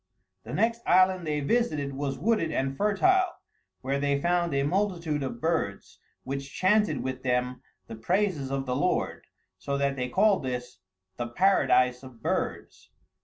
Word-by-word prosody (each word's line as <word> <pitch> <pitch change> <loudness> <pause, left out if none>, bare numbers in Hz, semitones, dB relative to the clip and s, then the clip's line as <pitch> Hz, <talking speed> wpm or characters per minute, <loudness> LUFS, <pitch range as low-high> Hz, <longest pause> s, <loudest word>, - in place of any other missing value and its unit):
The - - -8
next 230 +3 +1
island 185 -1 +4
they 150 -1 -1
visited 150 - 0
was 135 0 -3
wooded 180 - +1
and 135 -1 -1
fertile, 370 - +2 0.5
where 135 +2 -1
they 140 0 +1
found 175 +1 +1
a 140 0 +1
multitude 170 -3 0
of 130 -3 -4
birds, 160 -10 -2 0.2
which 135 +1 -5
chanted 210 +3 +2
with 130 -1 -4
them 125 0 -1 0.2
the - - -9
praises 165 - 0
of 135 0 -2
the 125 -1 -1
Lord, 140 - -1 0.3
so 140 0 -2
that 140 0 0
they 125 -1 -2
called 200 +6 +3
this 125 -5 -5 0.4
the 120 - -3
Paradise 125 -5 +3
of 130 -3 -13
Birds. - - -3
140 Hz, 155 wpm, -27 LUFS, 130-185 Hz, 0.5 s, island